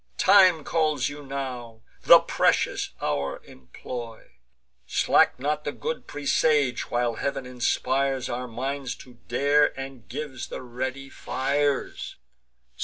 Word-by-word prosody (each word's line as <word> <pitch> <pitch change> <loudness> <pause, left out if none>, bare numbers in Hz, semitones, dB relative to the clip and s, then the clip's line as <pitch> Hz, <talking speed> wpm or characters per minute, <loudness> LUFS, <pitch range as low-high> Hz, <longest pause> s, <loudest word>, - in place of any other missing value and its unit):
Time 185 -5 +6
calls 155 -5 0
you 145 0 -9
now; 125 -5 -6 0.2
the - - +10
precious - - +1
hour 70 -2 -1
employ: 115 - -9 0.6
Slack - - +3
not 150 +3 -1
the - - -2
good 480 +1 -5
presage, 145 -2 +1
while 120 -1 0
Heav'n 140 -2 -3
inspires 130 +1 0
Our 125 +1 -4
minds 130 +2 -4
to 125 -2 -15
dare, 140 +3 +2
and 135 -3 -8
gives 135 -1 -5
the - - -7
ready 130 +2 -5
fires. 140 +3 -1
135 Hz, 115 wpm, -25 LUFS, 125-145 Hz, 0.6 s, the